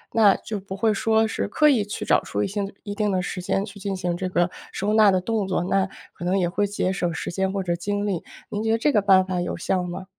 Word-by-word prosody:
那 210 -4 +6
就 215 -2 -5
不 190 0 -7
会 215 +2 +2
说 220 +2 +2
是 - - -2
刻 300 -1 +4
意 245 -7 +3
去 205 0 -5
找 - - +4
出 - - -2
一 - - 0
些 205 +2 -3 0.2
一 205 -1 -5
定 210 0 0
的 185 -1 +1
时 180 - -4
间 195 +2 0
去 200 -1 -11
进 195 0 -3
行 180 -2 -2
这 185 +1 -3
个 175 0 +1 0.2
收 205 +2 -1
纳 215 -1 +6
的 185 -1 +3
动 215 0 -1
作， 185 -2 0
那 190 +1 +1 0.2
可 - - -10
能 185 +2 +1
也 180 - +2
会 205 +4 0
节 195 -2 -1
省 175 -3 -1
时 160 - -4
间 190 +1 0
或 195 0 -2
者 175 -1 0
精 205 +4 -2
力。 190 -5 -2 0.3
您 210 +1 -3
觉 225 - +1
得 225 - +3
这 290 +6 +2
个 215 -6 +3
办 190 -2 +5
法 185 -1 -2
有 175 - -3
效 180 +2 0
吗？ 180 +1 -6
195 Hz, 300 characters per minute, -24 LUFS, 185-210 Hz, 0.3 s, 那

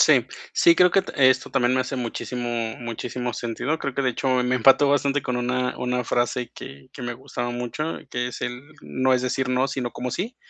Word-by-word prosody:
Sí. - - +5 0.3
Sí, 340 -1 +5
creo, 180 0 +5
que 195 - +4
t - - -9 0.2
esto 130 0 +1
también 125 -2 +2
me 130 - +2
hace 130 +1 -3
muchísimo 120 -1 -3
muchísimo 120 +1 -4
sentido, 125 +8 -2
creo 140 -3 -4
que 140 - 0
de 130 - +2
hecho 135 - -2 0.2
me 125 +1 +1
empató 135 +3 +5
bastante 140 0 +2
con 125 -1 -2
una 125 +1 -1
una 125 -1 -1
frase 120 +1 0
que 70 -1 -10
que - - -9
me 120 -1 -3
gustaba 120 0 -5
mucho, 125 +7 -3
que 125 0 -2
es 125 - -8
el: 125 +2 -4 0.2
"No 130 0 0
es 125 0 +2
decir 130 0 -1
no, 130 +1 +2
sino 130 -3 -3
como 125 +1 -4
sí". 225 +8 -3
125 Hz, 215 wpm, -24 LUFS, 120-135 Hz, 0.3 s, Sí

